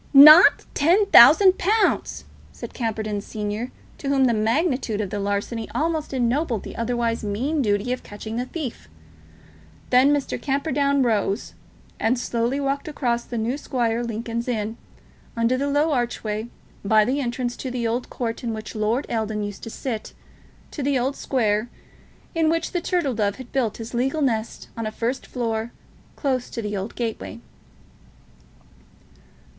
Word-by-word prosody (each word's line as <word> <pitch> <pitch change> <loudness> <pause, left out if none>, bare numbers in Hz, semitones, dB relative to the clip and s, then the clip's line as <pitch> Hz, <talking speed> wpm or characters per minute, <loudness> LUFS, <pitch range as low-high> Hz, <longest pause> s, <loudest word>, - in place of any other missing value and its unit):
"Not 310 +8 +9
ten 355 +8 +3
thousand 370 +4 +8
pounds!" 425 +3 +1 0.3
said - - -9
Camperdown 215 -3 -2
Senior, 210 +4 -4 0.3
to 275 - -4
whom 270 -1 +3
the 240 - +3
magnitude 230 - 0
of 200 -3 -3
the 205 - -2
larceny 205 +3 -2
almost 320 -1 -1
ennobled 250 - 0
the - - -8
otherwise 230 -1 -1
mean 255 +10 -1
duty 205 +1 0
of 255 - -5
catching 220 +2 -8
the 250 +1 -2
thief. 270 - -6 1.0
Then 255 +3 +6
Mr. 290 -2 -1
Camperdown 280 -1 +1
rose, 215 -2 0 0.5
and 230 +3 +1
slowly 240 +2 -1
walked 280 +1 -2
across 240 -6 -1
the 240 - -5
New 235 +6 -1
Square, 240 -3 -1
Lincoln's 230 +1 -4
Inn, 220 -2 -2 0.6
under 230 +2 +2
the 280 +2 -1
low 295 +3 +2
archway, 235 -4 -2 0.3
by 215 +1 +4
the 265 +5 0
entrance 245 -1 -2
to 260 - -5
the 245 -2 -2
old 240 +2 -2
court 230 -1 -4
in 230 -2 -2
which 215 0 -7
Lord 220 +5 0
Eldon 220 -2 -2
used 205 -1 -6
to - - -6
sit, 225 -1 -5 0.6
to 295 - -5
the 275 0 +1
Old 260 +3 -1
Square, 220 -3 0 0.6
in 325 -1 +2
which 330 0 -1
the 355 - -1
Turtle 340 -9 0
Dove 205 -2 0
had 260 -2 -11
built 245 -6 0
his 230 +1 -8
legal 270 +5 0
nest 225 -4 -2
on 230 -1 -3
a - - -4
first 235 +4 -3
floor, 230 -2 -3 0.4
close 260 -4 -1
to 230 - -5
the 210 0 -3
old 195 +3 -5
gateway. 230 -1 -4
240 Hz, 160 wpm, -23 LUFS, 220-275 Hz, 1.0 s, Not